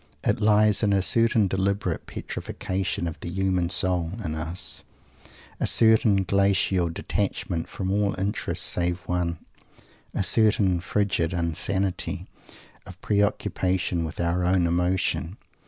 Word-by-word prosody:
It 105 - 0
lies 105 -1 +4
in 105 -2 +2
a 95 - +3
certain 115 -1 +2
deliberate 95 +2 -1
"petrifaction" 95 -2 -4
of 85 -1 -6
the - - -6
human 95 -1 0
soul 90 -2 +3
in 80 - -2
us; 80 +3 -4 0.8
a - - +1
certain 110 -3 +4
glacial 95 -2 +2
detachment 85 0 -3
from 95 -1 -4
all 100 -1 0
interests 100 +2 -1
save 90 0 0
one; 85 0 -2 0.7
a - - -1
certain 100 -2 +3
frigid 95 -3 0
insanity 90 +3 -2 0.6
of 95 -1 -11
preoccupation 95 -4 0
with 80 - -6
our 85 +1 0
own 90 0 +2
emotion. 90 +2 0
95 Hz, 120 wpm, -25 LUFS, 85-100 Hz, 0.8 s, lies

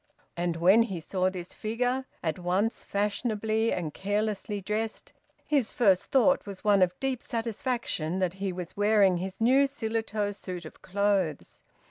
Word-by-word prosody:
And 175 -1 -1
when 185 +7 +5
he 195 -7 -1
saw 185 +3 0
this 180 -1 -7
figure, 245 +4 -1 0.2
at 160 0 -1
once 185 +6 0
fashionably 215 +2 0
and 160 -4 -2
carelessly 205 +1 -2
dressed, 215 +3 -3 0.3
his 280 -7 +1
first 195 -6 +3
thought 275 -2 +3
was 195 -2 -8
one 205 -2 +4
of 180 0 +2
deep 265 -2 -1
satisfaction 230 - -2
that 185 -2 0
he 195 -1 0
was 180 -1 -7
wearing 205 -3 +4
his 190 +1 -5
new 265 +5 +5
Shillitoe 220 -5 -2
suit 180 -4 -7
of 155 - -12
clothes. 195 -5 -1
205 Hz, 150 wpm, -28 LUFS, 185-225 Hz, 0.3 s, when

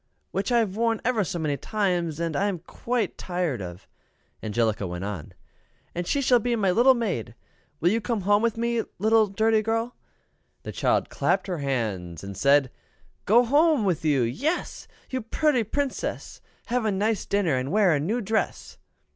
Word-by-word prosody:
" - - -47
Which 195 +5 -2
I 240 - +4
have 215 -5 +1
worn 230 0 +1
ever 235 -4 +2
so 180 -1 -4
many 150 -3 -1
times, 175 -7 -1
and 165 -2 -2
am 200 +2 0
quite 225 +5 -3
tired 175 - -2
of," 90 0 -8 0.5
Angelica 110 -2 0
went 90 +1 -5
on; 100 -7 -6 0.6
"and 175 0 -4
she 280 - +1
shall 250 -2 +4
be 240 +1 0
my 200 -5 +2
little 245 +7 +5
maid. 185 - -3 0.4
Will 170 - +3
you 225 +2 +1
come 230 -2 -2
home 205 +2 +3
with 230 -1 0
me, 235 0 0 0.2
little 220 +2 +4
dirty 220 +2 +2
girl?" 225 +2 -1 0.7
The - - -5
child - - +1
clapped - - +1
her 180 -4 -3
hands 105 - -3
and 100 0 -7
said, 140 0 +3 0.5
"Go 235 +4 +5
home 290 -1 +3
with 175 -5 0
you 145 -5 +2
yes! 285 - -2 0.2
You 260 -1 -1
pooty 255 +2 +1
Princess! 275 +6 -3 0.2
Have 245 0 0
a 215 - +1
nice 205 +2 0
dinner, 195 -8 +1
and 130 +2 -2
wear 200 -4 +4
a 145 - +1
new 210 +12 -1
dress!" 220 +1 -2
200 Hz, 180 wpm, -25 LUFS, 145-230 Hz, 0.7 s, little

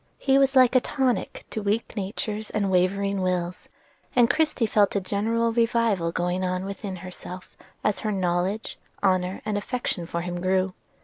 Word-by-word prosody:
He 270 0 +3
was 275 0 +3
like 255 -2 +6
a - - +8
tonic 260 -1 -1
to 220 - -3
weak 210 +3 -1
natures 210 +1 -3
and 200 -2 0
wavering 195 +2 +1
wills; 180 -1 -2 0.5
and 240 -2 +5
Christie 310 -6 +1
felt 210 -2 +3
a - - +3
general 225 +4 0
revival 230 -7 +2
going 180 +2 -1
on 185 0 -1
within 195 0 -5
herself 180 0 -9 0.3
as 210 - +1
her 215 - -1
knowledge, 185 +2 -1 0.2
honor, 185 -1 +1
and 210 -1 0
affection 205 -7 -3
for 170 0 -2
him 175 0 -4
grew. 185 0 +1
200 Hz, 165 wpm, -25 LUFS, 185-230 Hz, 0.5 s, a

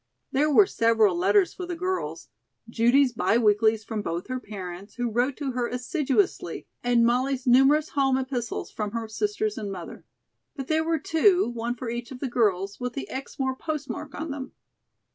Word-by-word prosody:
There 290 +3 +2
were 345 +7 +6
several 225 - +3
letters 190 0 +3
for 360 -1 -6
the 350 - -3
girls; 370 +2 -3 0.4
Judy's 240 +3 +3
bi 205 +1 +2
weeklies 220 0 +3
from 215 0 -4
both 170 +2 -4
her 255 0 -2
parents, 195 -3 -8
who 245 -2 -2
wrote 245 +4 0
to 280 -3 -3
her 245 -1 -1
assiduously, 285 +8 -1 0.2
and 240 -1 +4
Molly's 255 +2 +1
numerous 270 +5 +5
home 270 -2 +2
epistles 255 -3 -3
from 210 -1 -4
her 230 -1 -3
sisters 420 - -2
and 205 -2 -4
mother. 180 -3 -8 0.5
But 270 -3 -6
there 315 0 +2
were 325 0 +1
two, 355 +5 +3
one 235 +1 -3
for 245 +1 -6
each 235 0 -4
of 260 - -9
the 275 - -2
girls, 200 -5 0
with 250 -1 -3
the 275 - -5
Exmoor 265 0 -3
postmark 300 0 -5
on 315 -1 -4
them. 275 -2 -6
250 Hz, 180 wpm, -26 LUFS, 225-280 Hz, 0.5 s, were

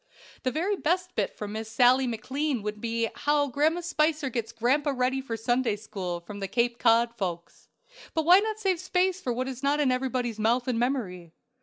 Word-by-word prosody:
The 260 - 0
very 345 +10 0
best 360 +1 -1
bit 205 - -2
from 210 -1 -5
Miss 220 +1 -5
Sallie 250 +3 +4
McLean 260 +2 -2
would 210 0 -4
be 230 0 0
how 290 0 +1
"Grandma 310 +6 +1
Spicer 305 -4 0
gets 230 -2 -3
Grandpa 265 +6 +1
Ready 255 +1 0
for 235 -4 -5
Sunday 240 0 +1
school," 185 -4 -5
from 200 +4 -9
the 195 - -3
"Cape 240 +2 0
Cod 235 0 +4
Folks;" 175 -6 -5 0.5
but 320 -1 +1
why 360 +3 +8
not 435 +1 -2
save 385 -5 0
space 370 +2 0
for 250 - -2
what 255 +2 -2
is 260 -1 -6
not 285 +1 +1
in 280 -3 +3
everybody's 255 -3 -1
mouth 235 +3 +1
and 245 -3 0
memory? 190 -10 -2
250 Hz, 195 wpm, -27 LUFS, 225-295 Hz, 0.5 s, why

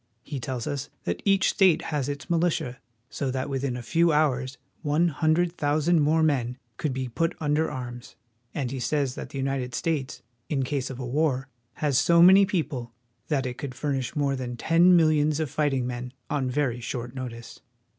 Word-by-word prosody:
He 140 -2 -5
tells 125 -1 -4
us 145 0 -3
that - - -3
each 195 -1 +4
state 190 -4 +4
has 145 -2 -1
its 140 -2 -5
militia, 165 -7 0 0.3
so 135 - -2
that 130 +2 -3
within 135 -2 -2
a 120 - -7
few 170 +7 +3
hours 135 -4 +1 0.2
one 155 +3 +2
hundred 165 +3 +1
thousand 155 +3 +2
more 155 +2 +3
men 125 -5 +1 0.2
could 150 - -1
be 130 0 -3
put 165 +8 -1
under 155 +1 +1
arms; 120 -1 -7 0.4
and 130 -4 -3
he 135 - -4
says 140 0 0
that - - -7
the - - -7
United 135 -2 -2
States, 150 -6 -2 0.3
in 140 -4 0
case 135 0 -2
of 130 - -6
a 125 - -5
war, 135 0 0 0.2
has 145 -3 +1
so 170 +3 +4
many 190 +3 +8
people 150 - -2 0.4
that 140 -4 0
it 125 0 -5
could 135 -3 -5
furnish 135 -3 -2
more 140 -2 +1
than 125 -2 -5
ten 170 +6 +5
millions 155 -2 +3
of 155 -4 -2
fighting 140 -4 0
men 125 0 -5 0.2
on 135 -3 0
very 125 -2 0
short 120 0 -5
notice. 120 -3 -7
140 Hz, 185 wpm, -26 LUFS, 130-155 Hz, 0.4 s, many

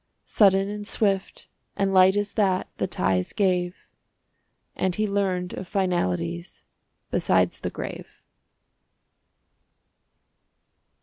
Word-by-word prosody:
Sudden 195 -2 +4
and 205 0 -5
swift 195 -4 -1 0.3
and 195 -1 0
light 190 +1 +6
as 205 0 -1
that 190 -4 +1
The - - -1
ties 95 - -1
gave, 180 -2 0 0.9
And 185 -2 0
he 215 0 0
learned 190 -3 -1
of 185 - -6
finalities 90 - -2 0.5
Besides - - +1
the - - -3
grave. - - -8
190 Hz, 100 wpm, -25 LUFS, 180-200 Hz, 0.9 s, light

